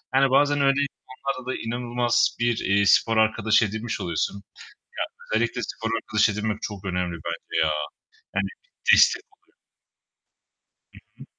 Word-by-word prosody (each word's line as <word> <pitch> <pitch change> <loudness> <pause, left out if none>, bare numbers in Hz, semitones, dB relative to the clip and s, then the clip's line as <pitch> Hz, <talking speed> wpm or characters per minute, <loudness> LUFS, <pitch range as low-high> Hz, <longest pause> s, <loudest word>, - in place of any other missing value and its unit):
Yani, 135 0 +5
bazen 145 +1 +3
öyle 135 +1 +3
insanlarla 130 -1 -6
da - - -3
inanılmaz 120 +1 0
bir, 120 -1 +1
iii, 100 0 +2
spor 115 -1 +4
arkadaşı 110 0 +3
edinmiş 110 +3 -4
oluyorsun. 85 +3 -1
Ya, 100 - -15 0.8
özellikle 120 +1 -1
spor 110 +2 -4
arkadaşı 110 -1 +2
edinmek 105 +1 -2
çok 100 -2 -6
önemli 90 -2 -2
bence 85 -1 -3
ya! 80 - +1 0.7
Yani, - - +1 0.4
destek - - +5
oluyor. - - -37 1.4
Hı - - -15 0.2
hı. - - -11
115 Hz, 135 wpm, -24 LUFS, 100-125 Hz, 1.4 s, Yani